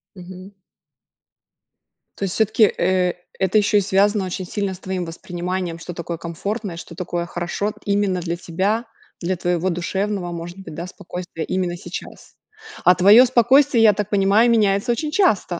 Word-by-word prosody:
Мгм. 185 +1 -11 1.7
То - - -5
есть 185 - -3
всё-таки, 220 +1 +3
э, 180 0 +1 0.3
это 190 +2 +2
еще 210 0 +3
и 205 - +4
связано 200 +1 +2
очень 185 0 -4
сильно 200 0 -3
с 180 - -11
твоим 185 -2 -3
восприниманием, 175 +1 -4
что 175 +1 -7
такое 170 0 -5
комфортное, 190 +3 -5
что 170 0 -10
такое 175 -1 -3
хорошо 175 +5 -3
именно 200 -2 +1
для 170 0 -2
тебя, 195 +7 -1 0.3
для 185 +2 -1
твоего 175 +1 -1
душевного, 185 +1 -2
может 170 +2 -7
быть, 165 -5 -9
да, 170 +3 -5
спокойствия 175 -2 -7
именно 185 -2 -1
сейчас. 175 +1 -9 0.5
А 180 - +8
твое 205 +7 +7
спокойствие, 255 0 +4
я 210 -2 +7
так 210 0 -3
понимаю, 205 +4 +4
меняется 205 0 +2
очень 300 +5 -2
часто, 210 - +1
185 Hz, 160 wpm, -21 LUFS, 175-205 Hz, 1.7 s, А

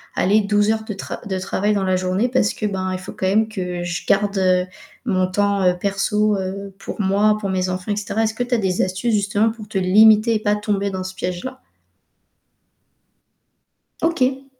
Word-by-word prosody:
allez 205 +4 +3
12 205 +1 +2
heures 220 0 -1
de 215 - -4
tra 195 - -6
de 190 -2 -2
travail 205 +2 0
dans 200 -2 0
la 185 - +2
journée»? 185 +5 0
Parce 245 -4 +1
que, 215 - -4
ben, 190 -2 -2
il 185 - -3
faut 185 - -9
quand - - -4
même 215 +3 +3
que 180 -4 -4
je 175 0 -4
garde, 200 0 +2
heu, 185 -1 +3 0.4
mon 185 -5 +1
temps, 200 +1 0
heu, 180 0 +4
perso, 205 +2 +1
heu, 195 +1 -5
pour 210 - -5
moi, 205 +2 +3
pour 200 - -2
mes 185 -1 -1
enfants, 185 +2 -3
et - - -2
cetera. 210 +1 -2
Est-ce 220 0 -1
que 245 - -1
tu 245 0 -4
as - - 0
des 190 -3 0
astuces 190 +6 -1
justement 205 +2 +1
pour 220 -2 -11
te 210 - -4
limiter 215 +4 +5
et - - +1
pas 210 -1 +1
tomber 205 -1 -1
dans 185 -1 -4
ce 185 0 -7
piège-là? 190 +10 -5 2.4
OK! 270 -5 0
200 Hz, 205 wpm, -20 LUFS, 185-215 Hz, 2.4 s, limiter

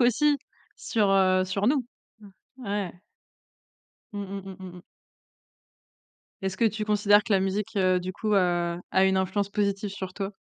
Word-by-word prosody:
aussi 285 +5 +4 0.4
sur, 210 -4 0
heu, 185 -1 +4
sur 195 +2 -1
nous. 265 0 +2 0.4
Mmh. 205 -2 -14 0.3
Ouais. 200 -3 -3 1.2
Mmh 205 - -4
mh, 195 0 -6
mmh, 190 -1 -9
mmh, 185 - -7
mmh. - - -11 1.6
Est-ce 190 0 -2
que 230 - +4
tu 215 0 -2
considères 205 0 +4
que 220 - -1
la 195 - +4
musique, 195 +2 -2
heu, 185 -1 +3
du 185 +1 -5
coup, 215 0 -1
a 175 -2 +1
a 190 - +4
une 190 0 +3
influence 190 +2 0
positive 200 0 -1
sur 190 -2 -6
toi? 195 +1 -4
195 Hz, 165 wpm, -26 LUFS, 190-210 Hz, 1.6 s, aussi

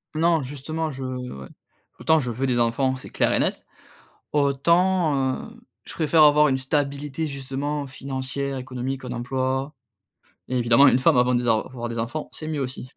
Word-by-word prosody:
Non, 165 -1 +3
justement 150 +4 -4
je 135 0 -7
ouais, 125 - -6 0.5
autant 160 0 +3
je 125 -3 -2
veux 130 +4 -2
des 120 -1 +1
enfants 130 +3 +1
c'est 130 - -9
clair - - +1
et - - +2
net, - - -1 0.7
autant, 150 +1 +2
heu, 235 +1 -16 0.2
je - - -9
préfère 160 0 +3
avoir 150 0 +6
une 135 -1 +1
stabilité 145 +2 -2
justement 140 +1 -4
financière, 135 0 -4
économique, 130 +1 -5
un 125 - -6
emploi 130 +3 -2 0.7
et 130 - -1
évidemment, 120 +3 +5
une 130 - +4
femme 125 - +4
avant 125 0 +3
des 120 0 0
avoir 120 +2 -1
des 115 0 -4
enfants, 130 +7 -3
c'est 155 - -6
mieux 155 -2 -2
aussi. 130 -1 -5
135 Hz, 170 wpm, -24 LUFS, 125-150 Hz, 0.7 s, avoir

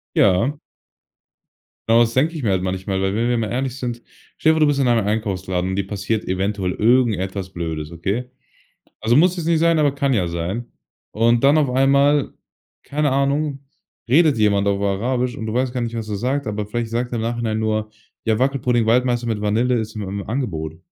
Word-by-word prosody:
Ja. 100 +10 +3 1.3
Genau, 115 +1 +5
das 115 -1 +3
denke 150 +7 +1
ich 155 - -5
mir 110 - +1
halt 95 -1 +1
manchmal. 95 +1 -2
Weil, 95 0 0
wenn 115 +3 0
wir 120 - +1
mal 110 -2 -2
ehrlich 130 0 -2
sind: 120 -2 -4 0.3
Stell 160 - +3
dir - - 0
vor, - - 0
du 155 - +5
bist 145 -1 +1
in 135 -2 +2
einem 115 -4 +2
Einkaufsladen 95 -4 -2
und 95 - -2
dir 100 0 -1
passiert 105 +2 -2
eventuell 95 0 -1
irgendetwas 105 -5 +1
Blödes, 80 -3 -4
okay? 100 +9 -3 0.7
Also, 115 +2 +2
muss 180 +4 +4
jetzt 170 -3 -4
nicht 165 -1 +2
sein, 165 -1 +3
aber 145 -2 +3
kann 140 -1 0
ja 100 -8 +1
sein. 85 +7 -3 0.5
Und 115 +3 +2
dann 140 +2 +6
auf 145 -4 +2
einmal, 140 +2 +3 0.5
keine 145 -1 -1
Ahnung, 140 +1 0 0.5
redet 150 +3 +4
jemand 100 -2 +2
auf 100 -1 +1
Arabisch 120 +5 -1
und 110 - -5
du 110 - -3
weißt 125 0 0
gar 125 - -2
nicht, 115 -1 -3
was 110 -1 -5
er 105 - -2
sagt, 130 +5 -1
aber 105 0 -3
vielleicht 115 +1 -3
sagt 120 +2 -2
er - - -1
im 110 - -2
Nachhinein 115 -1 -2
nur: 110 -1 -1 0.4
„Ja, 110 -1 +2
Wackelpudding-Waldmeister 125 -2 +1
mit 110 -2 -2
Vanille 115 +4 +1
ist 110 -1 -4
im 105 - -5
im 100 0 -5
Angebot.“ 80 - -3
115 Hz, 205 wpm, -21 LUFS, 100-130 Hz, 1.3 s, dann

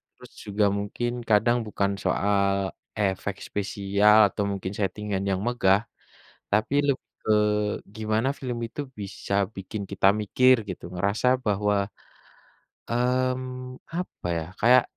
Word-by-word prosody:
terus - - -15
juga 105 0 +1
mungkin 110 +4 -2 0.2
kadang 115 +3 +4
bukan 100 -1 0
soal 100 -1 +1 0.3
efek 100 0 0
spesial 100 +1 +3
atau 105 - -2
mungkin 95 -1 -4
setting-an 100 0 -2
yang 95 -1 0
megah, 100 -4 +3 0.7
tapi 110 +6 +1
lebih 140 - +1 0.3
ke 110 - +5 0.6
gimana 110 +3 0
film 125 -3 -3
itu 145 - -6 0.2
bisa 100 0 -5 0.2
bikin 100 +2 -5
kita 95 0 +3
mikir 130 +5 +5
gitu, 90 - -6
ngerasa 100 +7 0 0.2
bahwa 105 0 +2 1.1
mmm 130 +1 -1 0.2
apa 180 - -5
ya 80 - -3 0.2
kayak 125 +3 +6
105 Hz, 120 wpm, -26 LUFS, 100-120 Hz, 1.1 s, kayak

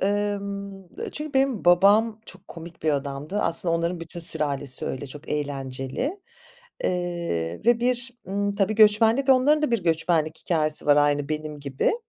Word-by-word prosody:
Emm, 200 0 -2 0.3
eee, - - -5
çünkü 300 -1 -5
benim 265 -5 +1
babam, 205 +5 +4
çok 190 -1 -11
komik 165 0 -11
bir 155 - +1
adamdı. 140 +6 -3
Aslında 165 0 +1
onların 170 +1 -2
bütün 170 +1 -8
sülalesi 145 -5 +3
öyle, 135 +2 -5
çok 145 +3 -8
eğlenceli, 140 - -4 0.6
eee, 170 - -2
ve 240 -1 +4
bir, 245 +1 -1 0.2
ımm, 200 +1 -1
tabii 200 +1 0
göçmenlik, 225 +5 +4
onların 275 +4 +4
da 300 - +1
bir 230 -6 -1
göçmenlik 160 -1 0
hikâyesi 155 -4 -2
var, 145 -1 +5
aynı 145 -1 +2
benim 155 -1 -5
gibi. 140 - -1
175 Hz, 155 wpm, -24 LUFS, 150-210 Hz, 0.6 s, var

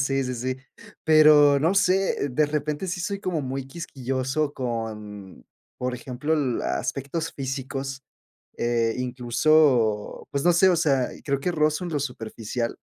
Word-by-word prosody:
sí, 135 -1 +1
sí, 125 0 -3
sí. 130 +2 -3 0.5
Pero 150 -2 +6
no 165 +6 +2
sé 190 -6 +2
de 150 +4 +2
repente 150 +3 -2
sí, 180 +1 -3
soy 200 +2 -3
como 175 -5 -2
muy 135 0 -4
quisquilloso 135 -1 -3
con, 105 -5 -6 0.3
por 125 0 -2
ejemplo, 130 +5 -2
la 125 - -1
aspectos 155 +4 -3
físicos, 135 0 -4 0.6
eh, 115 -1 +1
incluso, 125 -2 +2
pues, 140 +3 -2
no 175 - +5
sé, 190 +3 +5
o 175 - +3
sea, 135 -5 +2 0.2
creo 140 -1 -1
que 180 - -1
rozo 155 +2 +1
en 175 - -4
lo 145 - 0
superficial. 115 -2 -4
135 Hz, 150 wpm, -25 LUFS, 125-155 Hz, 0.6 s, Pero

